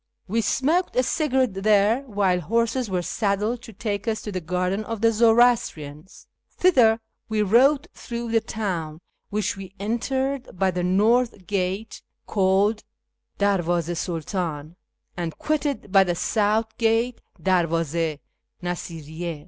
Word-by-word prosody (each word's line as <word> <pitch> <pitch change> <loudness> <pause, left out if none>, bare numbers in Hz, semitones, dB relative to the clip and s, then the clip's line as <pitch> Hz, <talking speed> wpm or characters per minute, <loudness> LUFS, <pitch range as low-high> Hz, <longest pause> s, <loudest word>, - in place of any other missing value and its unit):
We 225 +4 +1
smoked 310 - +1
a 255 - +3
cigarette 260 - 0
there, 215 +4 +4
while 200 -5 +1
horses 230 - 0
were 180 -2 -1
saddled 210 +5 -1
to 230 - -11
take 205 0 -4
us 220 -1 -1
to 210 - -5
the 185 -2 -3
garden 180 +4 -1
of 225 0 -5
the 230 0 +4
Zoroastrians. 225 -9 +2 0.3
Thither 245 -11 +5 0.3
we 215 -1 +1
rode 265 +8 +4
through 235 -1 -5
the 225 - +4
town, 170 -9 -4 0.3
which 210 -1 -1
we 195 -1 -10
entered 260 +3 -2
by 190 +1 +2
the 180 0 -2
north 210 +3 +2
gate 195 +2 -2 0.2
(called 200 +2 +2 0.5
Dcrivdz6 175 -4 +1 0.4
i 160 -5 -3
Sidtdni) - - -24 0.4
and 170 -3 -4
quitted 295 -8 -2
by 195 -1 +7
the 175 -2 -1
south 220 +4 0
gate 230 +2 +1 0.2
{Derwdz6 170 -4 +1
i 150 -2 -6 0.5
Ndsiriyy6). 165 -2 -5
205 Hz, 135 wpm, -24 LUFS, 180-230 Hz, 0.5 s, by